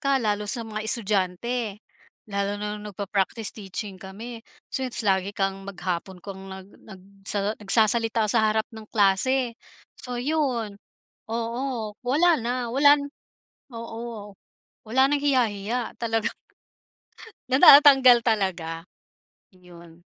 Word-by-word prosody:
ka, 275 0 +1
lalo 210 -4 -1
sa 235 +1 -1
mga 215 -1 -5
estudyante, 215 +1 -1 0.5
lalo 200 -1 -2
na 210 0 -5
nung 210 - -8
nagpa-practice 200 +2 -2
teaching 195 -1 -7
kami. 225 +5 -9 0.3
So - - -2
its 235 - -2
lagi 195 0 0
kang 195 0 -1
maghapon 180 -1 -5
kang 195 -1 -8
nag 190 +1 -11
nag 195 -3 -13 0.3
nagsa 205 0 +2
nagsasalita 220 +1 +3
sa 220 -2 +3
harap 215 0 0
ng 220 -1 -11
klase. 230 +5 +1 0.4
So 250 -1 -6
yun 245 -7 -2 0.5
oo, 230 0 -3
wala 310 +5 +2
na, 235 +2 -2 0.2
wala 285 +2 +6
na 285 - -5 0.7
oo 230 -2 -8 0.6
wala 260 +4 +3
nang 290 +1 0
hiya-hiya, 240 -4 0
talagang 225 -1 -1 1.2
natatatanggal 265 -3 +8
talaga. 180 -7 -2 0.7
Yun. 170 -2 -16
220 Hz, 120 wpm, -24 LUFS, 195-245 Hz, 1.2 s, natatatanggal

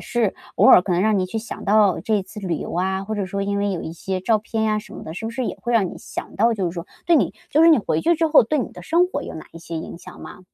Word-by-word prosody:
是 230 -5 -1 0.2
偶 - - +5
尔 - - +8
可 185 - -2
能 175 - +2
让 215 0 +3
你 185 - +1
去 205 +5 -4
想 220 +1 -8
到 205 -3 +3
这 205 +2 0
次 210 +2 -10
旅 175 -5 -2
游 - - -6
啊， 190 +2 -1
或 220 - -4
者 205 -2 -2
说 200 +1 -4
因 200 0 -1
为 200 0 0
有 180 -4 -3
一 160 - -6
些 185 +2 -4
照 220 +3 +2
片 220 +1 -3
呀 215 -1 +1
什 - - -13
么 - - -9
的， 160 - -7
是 220 - -6
不 225 - -3
是 250 +2 -3
也 - - -4
会 240 - -2
让 215 -5 +3
你 - - -8
想 - - -7
到 230 +3 +3
就 200 -4 -2
是 - - -6
说 170 +1 -6 0.2
对 345 - +5
你 - - +1 0.2
就 310 +3 +3
是 335 - +7
你 315 - +6
回 160 -6 -1
去 340 - +2
之 330 - +2
后 310 -4 +6
对 300 +7 -1
你 255 - -3
的 180 - -11
生 340 - +3
活 370 - -4
有 - - -8
哪 155 - -8
一 165 - -10
些 165 0 -7
影 160 +1 -7
响 - - -13
吗？ - - -10
205 Hz, 355 characters per minute, -22 LUFS, 185-230 Hz, 0.2 s, 尔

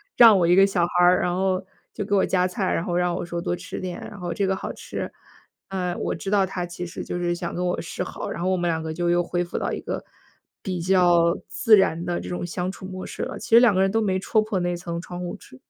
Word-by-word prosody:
让 225 -5 +8
我 170 - +3
一 175 - +5
个 195 +1 +7
小 185 -3 +1
孩 175 0 +2
儿。 180 +1 +5
然 175 - 0
后 190 0 +1 0.3
就 205 - -4
给 200 0 +1
我 190 - +4
夹 180 -1 +2
菜， 185 +1 -1
然 - - 0
后 175 - -2
让 180 0 +1
我 - - -3
说 170 0 -4
多 175 - -1
吃 180 +1 -7
点， 180 -1 -5
然 205 - -11
后 175 -1 -3
这 195 +3 0
个 190 - +1
好 - - -5
吃。 - - -6 0.6
啊， 180 -2 -2
我 - - -2
知 195 - -5
道 200 -2 +4
他 180 -2 -4
其 175 0 -6
实 170 - -6
就 175 - -4
是 175 0 0
想 175 -1 -4
跟 180 +1 -2
我 180 - -1
示 170 - -6
好， - - -6
然 - - -5
后 180 - +1
我 190 - +2
们 175 0 0
两 160 -1 -1
个 160 0 -4
就 175 +1 -1
又 175 0 +3
恢 175 +1 -1
复 175 - -5
到 - - -2
一 - - -4
个 - - -4 0.6
比 185 -4 -3
较 175 -2 +4
自 225 - +5
然 175 -3 +1
的 175 0 -1
这 - - -7
种 175 0 -3
相 180 +2 -3
处 190 - -10
模 185 0 -6
式 - - -5
了， - - -5
其 - - -8
实 230 +1 +8
两 235 -5 +5
个 190 - +3
人 195 - +3
都 225 - +2
没 190 -3 +1
戳 215 +3 +2
破 215 -3 -2
那 175 0 0
层 170 -1 -5
窗 175 -1 -8
户 175 - -4
纸。 130 - -15
180 Hz, 310 characters per minute, -24 LUFS, 175-190 Hz, 0.6 s, 让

